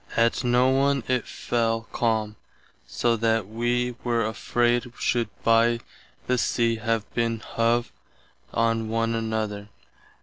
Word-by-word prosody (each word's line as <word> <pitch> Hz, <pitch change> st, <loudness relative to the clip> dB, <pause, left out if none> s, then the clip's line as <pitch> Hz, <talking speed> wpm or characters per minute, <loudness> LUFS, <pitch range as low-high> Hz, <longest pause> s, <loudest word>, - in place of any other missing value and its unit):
Att 115 Hz, 0 st, +2 dB
noone 130 Hz, +2 st, +3 dB
it 125 Hz, -1 st, 0 dB
fell 115 Hz, -1 st, -1 dB
calme, 110 Hz, -2 st, 0 dB, 0.5 s
so 120 Hz, -1 st, +1 dB
that 115 Hz, -2 st, +1 dB
[wee] 120 Hz, +3 st, 0 dB
were 120 Hz, -1 st, +1 dB
affraid 120 Hz, +2 st, 0 dB
should 120 Hz, -1 st, 0 dB
by 115 Hz, +1 st, +4 dB, 0.5 s
the 125 Hz, 0 st, +1 dB
sea 115 Hz, -1 st, +1 dB
have 115 Hz, -2 st, -1 dB
been 115 Hz, -1 st, 0 dB
hove 115 Hz, +1 st, 0 dB, 0.6 s
on 115 Hz, -1 st, 0 dB
one 115 Hz, 0 st, 0 dB
another. 110 Hz, -2 st, -3 dB
115 Hz, 115 wpm, -25 LUFS, 115-120 Hz, 0.6 s, by